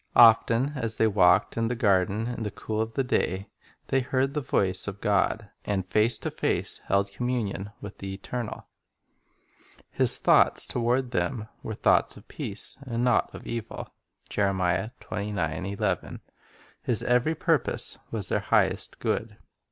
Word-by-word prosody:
Often 115 Hz, +3 st, +6 dB
as 115 Hz, -3 st, +2 dB
they 110 Hz, -, +4 dB
walked 95 Hz, -4 st, +4 dB
in 115 Hz, 0 st, +1 dB
the 125 Hz, -, -1 dB
garden 100 Hz, -2 st, +2 dB
in 120 Hz, -1 st, -4 dB
the 105 Hz, -, -2 dB
cool 110 Hz, +2 st, -3 dB
of 110 Hz, 0 st, -3 dB
the 135 Hz, -, +1 dB
day 100 Hz, -6 st, -1 dB, 0.4 s
they 135 Hz, -, +3 dB
heard 130 Hz, +1 st, 0 dB
the 150 Hz, -, -1 dB
voice 95 Hz, -7 st, 0 dB
of 100 Hz, -1 st, -5 dB
God, 105 Hz, +1 st, 0 dB
and 95 Hz, -3 st, -1 dB
face 110 Hz, +5 st, +2 dB
to -, -, -4 dB
face -, -, -1 dB
held 100 Hz, 0 st, +1 dB
communion 105 Hz, -3 st, -2 dB
with 100 Hz, -, -9 dB
the 95 Hz, 0 st, -5 dB
Eternal. 110 Hz, +4 st, -5 dB, 1.3 s
His -, -, +3 dB
thoughts -, -, +4 dB
toward 125 Hz, +1 st, 0 dB
them 110 Hz, +1 st, -2 dB
were 110 Hz, -, -5 dB
"thoughts -, -, +2 dB
of -, -, -15 dB
peace, -, -, -5 dB
and 120 Hz, -3 st, -3 dB
not 125 Hz, -3 st, +3 dB
of -, -, -10 dB
evil." 115 Hz, -1 st, -6 dB, 0.4 s
2 -, -, -2 dB, 2.4 s
His 120 Hz, -4 st, +1 dB
every 125 Hz, +6 st, +2 dB
purpose 160 Hz, -3 st, 0 dB
was 105 Hz, -5 st, -2 dB
their -, -, +1 dB
highest -, -, +1 dB
good. -, -, -2 dB
110 Hz, 145 wpm, -27 LUFS, 100-125 Hz, 2.4 s, Often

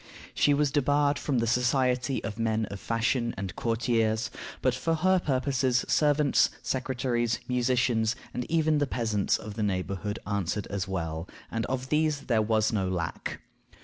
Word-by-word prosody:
She 145 Hz, -, +3 dB
was 145 Hz, -1 st, +2 dB
debarred 145 Hz, +1 st, +2 dB
from 140 Hz, -4 st, -1 dB
the 115 Hz, -, +2 dB
society 125 Hz, +2 st, +1 dB
of 105 Hz, +2 st, -5 dB
men 110 Hz, -1 st, +1 dB
of 100 Hz, -, -6 dB
fashion 115 Hz, +2 st, 0 dB
and 95 Hz, -3 st, -5 dB
courtiers, 115 Hz, -1 st, 0 dB, 0.3 s
but 130 Hz, -, +2 dB
for 165 Hz, +6 st, 0 dB
her 185 Hz, +3 st, +3 dB
purposes, 130 Hz, -4 st, +1 dB
servants, 150 Hz, -1 st, +3 dB
secretaries, 125 Hz, -3 st, -1 dB
musicians, 120 Hz, -2 st, +1 dB, 0.2 s
and 125 Hz, -, -4 dB
even 155 Hz, -2 st, +2 dB
the 145 Hz, -, +1 dB
peasants 110 Hz, -5 st, 0 dB
of 105 Hz, -, -8 dB
the 110 Hz, -, -4 dB
neighborhood 100 Hz, +1 st, -2 dB
answered 100 Hz, 0 st, -1 dB
as 100 Hz, -3 st, -2 dB
well, 85 Hz, -2 st, -3 dB, 0.2 s
and 115 Hz, 0 st, -2 dB
of 130 Hz, 0 st, -3 dB
these 150 Hz, -1 st, +1 dB
there 115 Hz, -3 st, +1 dB
was 110 Hz, 0 st, +1 dB
no 95 Hz, -3 st, 0 dB
lack. 90 Hz, -2 st, -3 dB
120 Hz, 155 wpm, -28 LUFS, 110-135 Hz, 0.3 s, She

